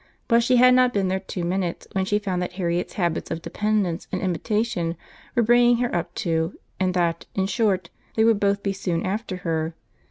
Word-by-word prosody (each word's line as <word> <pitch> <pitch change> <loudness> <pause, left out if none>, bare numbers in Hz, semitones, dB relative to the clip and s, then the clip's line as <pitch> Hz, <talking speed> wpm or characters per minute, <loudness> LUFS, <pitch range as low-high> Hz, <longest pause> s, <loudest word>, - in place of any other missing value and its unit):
But 235 -1 +5
she 250 +2 +3
had 250 +1 +7
not 250 -1 +4
been 195 -2 +1
there 190 +1 0
two 190 -1 -5
minutes 175 0 -2
when 190 -1 0
she 205 +2 +1
found 190 -4 -2
that 180 0 -3
Harriet's 175 -1 -2
habits 175 -4 -1
of 165 0 -4
dependence 205 -5 -1
and 185 - -1
imitation 185 -2 -1 0.4
were 240 - +4
bringing 240 +1 +5
her 245 0 -1
up 175 0 -3
too, 165 0 -1 0.2
and 185 -1 +1
that, 170 -2 0
in 190 - +1
short, 195 -4 0 0.2
they 220 - +3
would 225 -2 +4
both 200 0 +1
be 200 - 0
soon 180 -3 -2
after 200 +1 -2
her. 160 0 -1
190 Hz, 200 wpm, -24 LUFS, 175-215 Hz, 0.4 s, had